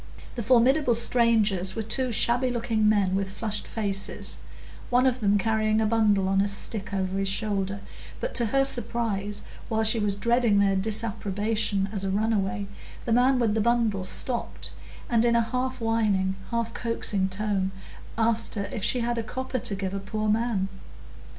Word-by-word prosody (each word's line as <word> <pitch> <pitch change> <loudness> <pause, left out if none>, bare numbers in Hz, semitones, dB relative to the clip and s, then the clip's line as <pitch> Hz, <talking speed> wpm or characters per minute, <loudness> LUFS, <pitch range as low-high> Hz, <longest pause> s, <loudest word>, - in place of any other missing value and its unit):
The 240 - -4
formidable 250 +3 +3
strangers 220 -6 +2
were 225 - -2
two 250 +4 +1
shabby 245 +3 +2
looking 230 -3 +1
men 200 -3 +2
with 195 0 0
flushed 210 +1 -3
faces, 200 -3 0 0.5
one 250 +1 +3
of 255 -1 +2
them 205 -2 +2
carrying 215 +1 +1
a 220 - +2
bundle 210 -3 +2
on 195 0 +2
a 200 - +1
stick 200 +1 -4
over 190 -1 -2
his 195 - -1
shoulder; 200 -1 -2 0.4
but - - -3
to 235 -2 +3
her 270 +5 +2
surprise, 220 -5 0 0.3
while 220 -1 +1
she 220 +1 +3
was 205 -2 0
dreading 235 0 +2
their 200 -1 +3
disapprobation 210 0 0
as 200 -3 -3
a 195 - -1
runaway, 205 0 0 0.4
the 230 - +1
man 255 +2 +4
with 230 -4 +1
the 220 - +1
bundle 225 -4 +1
stopped, 235 +6 -3 0.4
and 235 -1 +2
in 235 0 +3
a 235 - +4
half 255 +3 -3
whining, 210 -4 +1
half 230 -1 -2
coaxing 205 -5 -1
tone 195 -1 -1 0.5
asked 225 0 +1
her 200 -1 -3
if 210 - -4
she 240 +3 +2
had 235 0 -1
a - - 0
copper 260 +2 -4
to 205 - -1
give 190 -1 -4
a 200 - -2
poor 215 +2 -3
man. 215 -3 +1
215 Hz, 175 wpm, -26 LUFS, 200-235 Hz, 0.5 s, man